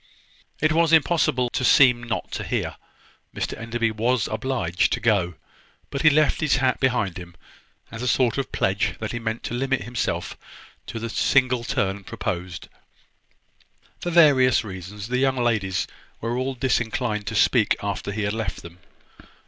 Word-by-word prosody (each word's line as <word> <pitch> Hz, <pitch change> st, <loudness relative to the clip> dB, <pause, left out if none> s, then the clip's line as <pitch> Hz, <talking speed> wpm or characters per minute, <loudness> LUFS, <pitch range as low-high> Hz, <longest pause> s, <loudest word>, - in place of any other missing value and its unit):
It 155 Hz, +1 st, +2 dB
was 165 Hz, +1 st, +3 dB
impossible 145 Hz, -6 st, +3 dB
to -, -, -2 dB
seem 125 Hz, -2 st, +5 dB
not 120 Hz, -1 st, -4 dB
to -, -, -4 dB
hear. -, -, -3 dB, 0.6 s
Mr -, -, -3 dB
Enderby 115 Hz, 0 st, -2 dB
was 115 Hz, +2 st, 0 dB
obliged 110 Hz, -7 st, -1 dB
to -, -, -1 dB
go: 95 Hz, -7 st, +1 dB, 0.6 s
but 140 Hz, -, -2 dB
he 155 Hz, -, +7 dB
left 150 Hz, 0 st, +2 dB
his 150 Hz, -2 st, +3 dB
hat 130 Hz, -1 st, +1 dB
behind 120 Hz, -9 st, 0 dB
him, 85 Hz, -1 st, -11 dB, 0.6 s
as 115 Hz, -, -7 dB
a 125 Hz, -, -2 dB
sort 125 Hz, 0 st, +2 dB
of 135 Hz, -, -4 dB
pledge 100 Hz, +1 st, 0 dB
that 110 Hz, -, -4 dB
he 120 Hz, -, -4 dB
meant 115 Hz, 0 st, -4 dB
to -, -, -4 dB
limit 135 Hz, +1 st, -1 dB
himself 120 Hz, -1 st, -3 dB, 0.5 s
to -, -, -6 dB
the 115 Hz, +1 st, -4 dB
single 125 Hz, +1 st, +2 dB
turn 100 Hz, -3 st, -1 dB
proposed. 90 Hz, -1 st, -5 dB, 1.3 s
For 175 Hz, -, -3 dB
various 140 Hz, -8 st, +5 dB
reasons, 100 Hz, +1 st, -8 dB
the 125 Hz, +1 st, 0 dB
young 135 Hz, 0 st, +2 dB
ladies 110 Hz, -6 st, 0 dB, 0.3 s
were 115 Hz, +2 st, -2 dB
all 130 Hz, +1 st, -2 dB
disinclined 120 Hz, -3 st, -1 dB
to 110 Hz, -, -3 dB
speak 110 Hz, 0 st, +3 dB
after 100 Hz, 0 st, -3 dB
he 105 Hz, +1 st, -3 dB
had 105 Hz, +1 st, -1 dB
left 110 Hz, -4 st, -4 dB
them. 85 Hz, +1 st, -12 dB
120 Hz, 165 wpm, -24 LUFS, 105-130 Hz, 1.3 s, he